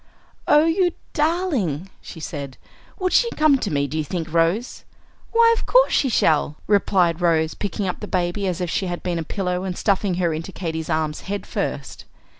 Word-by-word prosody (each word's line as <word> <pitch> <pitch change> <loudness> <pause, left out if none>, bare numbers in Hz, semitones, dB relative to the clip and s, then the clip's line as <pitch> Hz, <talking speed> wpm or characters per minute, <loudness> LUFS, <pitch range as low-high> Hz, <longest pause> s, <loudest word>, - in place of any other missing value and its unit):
"Oh, 300 +1 +6
you 350 +1 +2 0.2
darling!" 295 - 0
she 165 - -10
said. 140 -4 -6 0.4
"Would 370 -2 -1
she 475 - +4
come 305 -3 +4
to 205 - -2
me, 140 -2 0
do 155 +3 -3
you - - 0
think, 165 0 -5
Rose?" 170 +9 0 0.5
"Why, 460 0 +5
of - - -5
course - - +4
she 270 - +2
shall," 155 -8 +2
replied 185 -4 +2
Rose, 160 -2 +2
picking 200 0 -3
up 180 - -3
the 210 - -6
baby 185 +1 -1
as 180 -3 -2
if 175 - -2
she 190 - -1
had 175 -1 -4
been 175 -2 -1
a - - -2
pillow, 180 +1 -2
and 185 -2 -4
stuffing 195 -2 +1
her 175 -2 0
into 165 +4 -5
Katy's 160 -3 -4
arms 155 -1 -1
head 205 0 -3
first. - - -4
180 Hz, 195 wpm, -22 LUFS, 165-240 Hz, 0.5 s, Oh